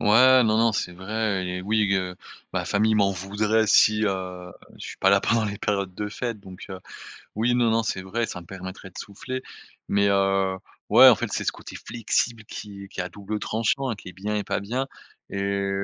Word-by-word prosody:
Ouais, 130 +5 +6
non, 110 -1 +2
non, 115 0 +4
c'est 90 -3 -2
vrai 100 +1 -2
et 90 0 -4
oui, 105 +1 +1
g 95 - +3
heu, 90 -1 -3 0.4
ma - - -1
famille 110 +2 +2
m'en 100 -2 +3
voudrait 105 +4 0
si, 105 +1 +5
heu, 90 -2 -3 0.2
je - - -18
suis - - -7
pas 95 - +3
là 100 0 +5
pendant 115 +1 +2
les 100 -1 -4
périodes 100 -3 -1
de 105 +2 -3
fêtes 115 0 -4
donc 95 -1 -11
heu, 95 -1 -7 0.5
oui, 115 +3 +1
non, 120 -2 +3
non, 115 +1 +2
c'est 105 - -2
vrai, 110 +6 -2
ça 90 - -5
me 85 - -14
permettrait 95 +1 -8
de - - -20
souffler 130 +6 -6 0.5
mais, 100 0 +3
heu, 95 -1 +2 0.3
ouais, - - +9
en - - +8
fait, - - -3
c'est - - -1
ce - - +1
côté - - -10
flexible 115 -1 -1
qui 100 -1 -8
est - - -12
qui 95 - -6
est - - +1
à 90 - -5
double 105 +3 -5
tranchant, 115 +4 0
qui 100 - -11
est - - -9
bien 105 +4 -3
et 105 - -1
pas - - -1
bien 125 +7 -2 0.4
et 100 0 -1
100 Hz, 225 wpm, -25 LUFS, 95-110 Hz, 0.5 s, ouais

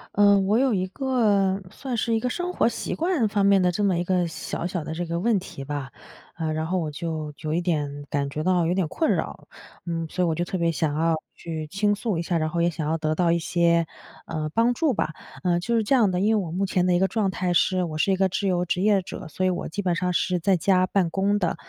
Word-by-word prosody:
呃， 200 -1 +6
我 205 +4 +2
有 260 -4 +2
一 185 -1 0
个 200 -4 +1
算 255 -4 -4
是 230 - 0
一 225 - +2
个 250 - -1
生 355 +7 -3
活 - - +3
习 - - -4
惯 325 - +1
方 205 -1 0
面 200 -1 +5
的 180 - +3
这 205 +4 -1
么 190 -3 +2
一 175 - 0
个 180 -1 +1
小 165 +1 -4
小 175 -3 -3
的 160 - -5
这 175 +1 -3
个 170 +1 -2
问 215 +1 +2
题 175 -7 -9
吧。 140 -2 -5 0.4
嗯， 160 -2 -2
然 155 0 -2
后 185 +3 0
我 160 -3 -2
就 155 0 -4
有 155 0 -3
一 170 - +1
点 145 -4 -2
感 140 -2 -1
觉 150 +2 -4
到 180 -1 +2
有 170 - +1
点 185 -3 0
困 320 - 0
扰， - - -4 0.4
嗯， 165 -1 -3
所 180 +2 0
以 - - +1
我 165 - +1
就 170 - -1
特 180 +2 -3
别 170 -1 +1
想 155 -2 -1
要 165 +1 +2 0.2
去 160 -2 -5
倾 205 +5 +1
诉 210 -2 -2
一 165 - -1
下， 170 0 0
然 155 0 0
后 170 - -2
也 170 +1 +2
想 155 -2 -4
要 160 - +1
得 155 -1 0
到 170 +1 +2
一 170 - +3
些， 170 0 +2 0.4
嗯， 155 -2 -3
帮 230 +6 +3
助 300 +1 +1
吧。 155 - -1 0.3
嗯， 175 -2 +2
就 235 +7 -1
是 225 - +2
这 210 - +1
样 235 -6 +5
的， 180 -1 -1
因 215 +3 +3
为 205 - +1
我 - - -6
目 190 +4 0
前 180 -1 +1
的 180 - +3
一 - - +4
个 190 - +3
状 210 -2 0
态 180 0 -1
是 185 +1 +2
我 155 -3 -4
是 195 - +2
一 - - +3
个 190 0 +2
自 195 +2 -1
由 180 -1 +1
职 180 +1 -1
业 200 -2 +3
者， 180 - -8
所 170 +5 -2
以 - - +3
我 175 - -3
基 200 +5 -4
本 180 -2 +1
上 180 0 0
是 180 0 0
在 190 +2 +2
家 185 +1 +3
办 190 -1 +1
公 200 +3 +1
的。 180 -4 0
180 Hz, 300 characters per minute, -25 LUFS, 165-200 Hz, 0.4 s, 呃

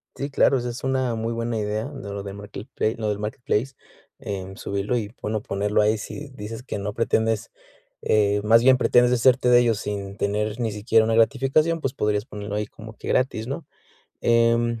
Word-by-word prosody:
Sí, 140 - -4
claro, 140 -1 +3
esa 120 -1 -3
es 120 - -7
una 130 -2 0
muy 115 +1 -2
buena 115 0 -2
idea 105 +1 -2
de 135 -7 -8
lo 100 0 -5
de 100 -1 -6
markleplai 105 +3 -4
lo 110 -2 -3
del 105 -1 -2
marketplace, 110 +3 -2 0.4
em, 100 -7 -6
subirlo 100 +5 -2
y, 110 -2 -4
bueno, 110 0 -2
ponerlo 100 +1 0
ahí, 105 +1 +2
si 145 +7 -7
dices 110 +1 -7
que 130 - -5
no 100 +1 -4
pretendes, 115 -1 0 0.5
eh, 105 -1 +2
más 115 +2 +6
bien 130 0 +6
pretendes 125 -1 +4
deshacerte 125 +1 +4
de 120 0 +7
ellos 115 -3 +2
sin 100 -1 -5
tener 105 +2 -1
ni 115 -2 -1
siquiera 110 +2 +2
una 115 0 +1
gratificación, 135 +8 +3
pues, 135 -4 -2
podrías 105 -4 0
ponerlo 105 -2 -6
ahí 105 0 -1
como 110 0 -12
que - - -9
gratis, 120 -3 0
¿no? 140 +5 -5 0.6
Em, 115 0 +2
110 Hz, 195 wpm, -24 LUFS, 105-125 Hz, 0.6 s, de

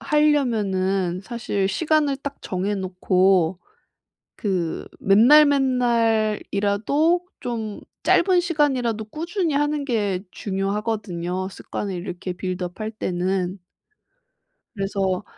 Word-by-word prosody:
하려면은 205 - +1
사실 205 -4 -2
시간을 300 - +1
딱 280 +1 -6
정해 195 +3 -2
놓고 185 -2 +2 0.8
그 180 -6 -2
맨날맨날이라도 240 - +3 0.2
좀 225 -4 -4 0.2
짧은 360 0 +4
시간이라도 265 -10 0
꾸준히 335 - -2
하는 295 0 0
게 205 -8 0
중요하거든요, 195 -2 -3
습관을 195 0 -5
이렇게 180 0 -5
빌드업 180 +1 -5
할 215 0 -2
때는. 185 -2 -2 1.2
그래서 195 -1 -1
210 Hz, 220 characters per minute, -23 LUFS, 190-275 Hz, 1.2 s, 짧은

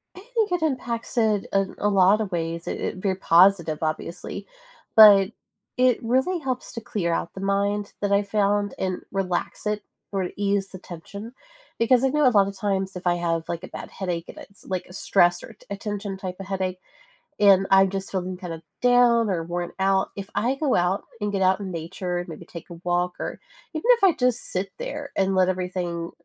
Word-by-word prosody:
I - - -10
think 440 -5 +1
it 355 -2 0
impacts 250 -5 -2
it 215 -3 +2
in 195 -1 +1
a 205 - +1
lot 195 +2 +4
of 205 -3 -3
ways. 165 0 -3
It - - -3
i - - -8
very 190 -1 0
positive, 170 -3 +4
obviously. 160 +2 -4 0.5
But 205 -3 +9 0.5
it 250 -1 +4
really 265 +10 +1
helps 260 -4 -4
to 230 - -5
clear 180 -6 -2
out 170 - -3
the 190 - -8
mind 200 +1 0
that 205 - 0
I 200 +1 +4
found, 205 0 +1
and 185 -1 -2
relax 190 0 -2
it, 210 0 -1 0.3
or 190 -3 -1
ease 200 -1 0
the 185 - -9
tension. 200 +7 -9 0.4
Because 240 +2 +3
I 265 - +4
know 295 0 +3
a - - +8
lotta 200 -2 +4
times 195 -1 -2
if 180 0 -4
I 175 - +3
have, 165 -1 -1
like, 170 +1 -4
a - - -6
bad - - -8
headache, 175 -3 -3
and - - -11
it's, 200 - -13
like, 185 -2 -3
a - - -12
stress 175 -2 +3
or - - -9
a - - -15
t - - -21
a 200 - -4
tension 205 -1 -4
type 185 -2 -5
of 195 - -7
headache, 185 -1 -2 0.6
and 195 -2 +6
I'm 195 0 +6
just 195 0 -4
feeling 185 -1 -2
kind 180 -2 -7
of 165 0 -8 0.2
down 245 -3 +4
or 175 -3 0
worn 175 +1 -4
out, 190 0 +2
if 200 -1 -6
I 235 +6 +1
go 285 -3 +1
out, 180 +3 +1 0.2
and 210 0 -1
get 195 -1 0
out 185 0 +4
in 195 -2 -5
nature 175 +2 -4
and 175 - -5
maybe 165 +1 -9
take 170 0 -10
a 170 - -9
walk, 175 0 0
or - - -5 0.3
even 315 - -3
if 430 - 0
I 370 - +6
just 250 -2 +2
sit 190 +2 -2
there, - - -5
and 195 0 +2
let 185 -1 +4
everything 180 -2 -3
195 Hz, 215 wpm, -24 LUFS, 180-210 Hz, 0.6 s, But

